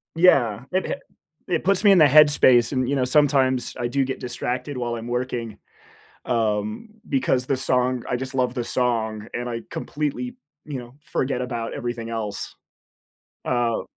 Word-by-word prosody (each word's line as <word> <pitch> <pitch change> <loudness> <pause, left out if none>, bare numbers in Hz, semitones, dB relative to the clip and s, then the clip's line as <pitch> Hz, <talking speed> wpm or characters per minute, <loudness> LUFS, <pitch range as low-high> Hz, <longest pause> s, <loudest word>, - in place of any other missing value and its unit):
Yeah, 130 - +4
it 185 +1 0
ha - - -1 0.5
it 180 - 0
puts 195 +1 +3
me 205 - +6
in 195 - +7
the 155 - +8
headspace 145 -5 +6
and, 130 -2 0
you 140 - +1
know, 130 -2 +1
sometimes 130 -2 +2
I 120 - -1
do 135 +2 +1
get 130 0 -4
distracted 125 +2 -3
while 120 -1 -2
I'm 115 0 -6
working, 120 -3 -3 0.7
um, 110 - -1 0.2
because 130 -2 +1
the 135 0 -1
song 125 -1 +1
I 125 - 0
just 130 +1 -5
love 125 -1 0
the 120 -2 -2
song 115 -3 -1
and 120 0 -3
I 115 -1 -3
completely, 155 - -3 0.3
you 145 -3 -5
know, 120 0 -10
forget 130 -3 -2
about 120 -2 -4
everything 120 -1 -4
else. 110 -3 -4 0.9
Uh 120 -2 0
125 Hz, 170 wpm, -23 LUFS, 120-135 Hz, 0.9 s, the